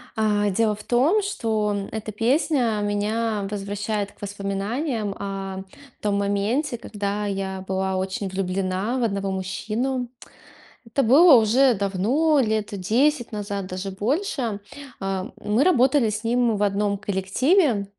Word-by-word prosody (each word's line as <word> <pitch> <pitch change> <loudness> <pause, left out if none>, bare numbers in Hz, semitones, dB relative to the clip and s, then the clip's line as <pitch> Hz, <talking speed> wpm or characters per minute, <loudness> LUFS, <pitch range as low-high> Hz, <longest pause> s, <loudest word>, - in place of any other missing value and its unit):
А, 205 -2 +1
дело 215 +1 +1
в 210 - -12
том, 305 - +3
что 220 - -1 0.2
эта 220 0 -5
песня 235 -1 +1
меня 210 0 -1
возвращает 205 0 -3
к - - -27
воспоминаниям 205 +3 -3
о 195 -1 -5 0.4
том 205 -1 0
моменте, 210 +7 0
когда 205 -1 -3
я 190 -1 -3
была 190 0 -1
очень 190 +1 -2
влюблена 190 +4 -1
в 245 - 0
одного 200 -3 -1
мужчину. 220 +7 -2 0.8
Это 270 +5 0
было 290 +6 +7
уже 240 +3 +4
давно, 225 - +2
лет 215 -1 -1
10 240 +7 +1
назад, 200 -2 -4
даже 185 +1 -5
больше. 235 - -1 0.4
Э, 195 -1 -2
мы 215 +6 +1
работали 270 -7 +4
с 210 +2 -4
ним 235 -1 +2
в 205 - 0
одном 200 0 +1
коллективе, 210 - +1
210 Hz, 130 wpm, -23 LUFS, 195-240 Hz, 0.8 s, было